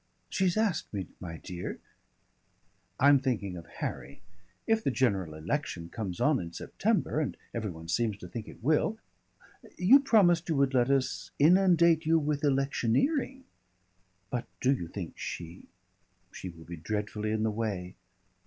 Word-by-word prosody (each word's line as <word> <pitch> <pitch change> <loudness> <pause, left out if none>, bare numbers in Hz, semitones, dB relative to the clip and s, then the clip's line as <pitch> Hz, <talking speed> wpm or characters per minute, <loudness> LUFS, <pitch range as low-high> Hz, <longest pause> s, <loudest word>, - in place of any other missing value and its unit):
"She's 190 0 +1
asked 215 -4 0
me, 95 -2 -2
my 80 -2 -7
dear 90 +1 -6 0.6
" - - -42
"I'm 140 0 +6
thinking 115 -8 -2
of 85 -1 -9
Harry. - - -6 0.4
If 225 0 +2
the - - +2
general 100 - 0
election 85 - -3
comes 95 -3 -5
on 150 -3 +3
in 85 -1 -6
September - - 0
and - - -2 0.2
every 110 -3 -2
one 80 -2 -9
seems 105 +3 0
to 90 - -9
think 110 +5 -6
it - - -13
will 160 - +2 0.8
You 215 +10 +7
promised 190 - +4
you 160 - +2
would 140 -1 +2
let 125 0 +3
us 135 -1 0
inundate 170 0 +5
you 165 0 +5
with 150 -1 -1
electioneering." 145 - +1 0.9
"But 120 -1 -2
do 130 +2 +3
you 85 -11 -4
think 85 -1 -7
she 85 +1 -6 0.3
" 90 0 -42
"She 95 - -7
will 80 -2 -13
be 85 +1 -7
dreadfully 105 +5 -3
in 110 0 0
the 110 - +1
way." 100 -5 -3
120 Hz, 160 wpm, -30 LUFS, -, 0.9 s, You